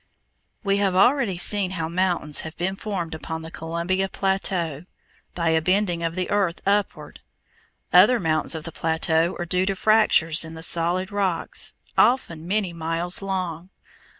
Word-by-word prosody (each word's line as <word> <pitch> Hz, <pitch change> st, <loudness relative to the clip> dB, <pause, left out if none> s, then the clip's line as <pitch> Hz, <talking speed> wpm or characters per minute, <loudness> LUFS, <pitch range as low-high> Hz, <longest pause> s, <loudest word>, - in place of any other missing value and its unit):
We 200 Hz, -1 st, +1 dB
have 195 Hz, -2 st, +1 dB
already 235 Hz, -1 st, +3 dB
seen 195 Hz, +1 st, +1 dB
how 160 Hz, -1 st, -2 dB
mountains 170 Hz, -3 st, 0 dB
have 160 Hz, -, -9 dB
been 190 Hz, +2 st, -1 dB
formed 195 Hz, -6 st, -4 dB
upon 160 Hz, 0 st, -6 dB
the 160 Hz, -, -9 dB
Columbia 170 Hz, +4 st, -2 dB
plateau, 180 Hz, -6 st, -1 dB, 0.5 s
by 170 Hz, -2 st, 0 dB
a 160 Hz, 0 st, +2 dB
bending 185 Hz, 0 st, +1 dB
of 165 Hz, 0 st, -2 dB
the 185 Hz, -1 st, -2 dB
earth 195 Hz, -4 st, +1 dB
upward. 200 Hz, -7 st, -1 dB, 0.7 s
Other 210 Hz, +8 st, +6 dB
mountains 160 Hz, -1 st, 0 dB
of 160 Hz, -, -5 dB
the 165 Hz, -, -7 dB
plateau 160 Hz, +1 st, 0 dB
are 175 Hz, -, -3 dB
due 180 Hz, +2 st, 0 dB
to 195 Hz, -, 0 dB
fractures 190 Hz, -7 st, +3 dB
in 160 Hz, 0 st, -9 dB
the 160 Hz, -, -8 dB
solid 175 Hz, +3 st, -1 dB
rocks, 195 Hz, -4 st, -1 dB, 0.2 s
often 170 Hz, -10 st, +2 dB
many 195 Hz, -2 st, 0 dB
miles 165 Hz, +3 st, -2 dB
long. 185 Hz, -3 st, -4 dB
175 Hz, 155 wpm, -23 LUFS, 165-195 Hz, 0.7 s, Other